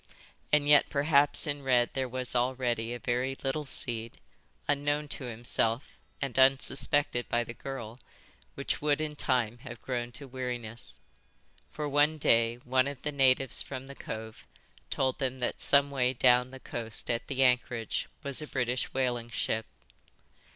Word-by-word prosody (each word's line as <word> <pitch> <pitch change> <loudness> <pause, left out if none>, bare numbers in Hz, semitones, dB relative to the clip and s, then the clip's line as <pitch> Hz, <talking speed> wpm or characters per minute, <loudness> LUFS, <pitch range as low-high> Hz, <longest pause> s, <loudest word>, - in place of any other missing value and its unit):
And 150 -1 +3
yet 145 -1 +6
perhaps 145 0 +3
in 145 -1 -3
Red 125 -3 +2
there 130 -1 -2
was 125 0 -3
already 120 -2 0
a 120 - -3
very 125 +3 -1
little 140 +3 -1
seed, 115 -4 -1 0.5
unknown 145 +1 0
to 135 - -4
himself 115 +1 -1 0.2
and 135 -2 -2
unsuspected 135 -1 +3
by 120 0 +2
the 115 - -8
girl, 120 -3 -7 0.6
which - - -2
would 150 0 +2
in 155 -1 -3
time 120 -5 0
have 120 -2 -9
grown 120 -2 -3
to 140 +2 -7
weariness. 120 - -5 0.7
For 150 -1 -4
one 145 +2 +3
day 115 -5 +3
one 130 +1 +2
of 140 -3 -7
the 150 - -2
natives 135 -2 +3
from 130 -1 -6
the 140 - -9
cove 110 -4 -8 0.4
told 130 +1 0
them 130 -2 -1
that 125 - -3
some 140 0 +4
way 130 -2 +1
down 125 0 +4
the 130 0 -10
coast 115 -3 -4
at 115 0 -3
the 135 -1 +1
anchorage 125 -3 +1 0.2
was 140 0 -2
a 150 - -6
British 125 -2 -1
whaling 120 -3 -1
ship." 110 -1 -2
130 Hz, 160 wpm, -30 LUFS, 120-140 Hz, 0.7 s, yet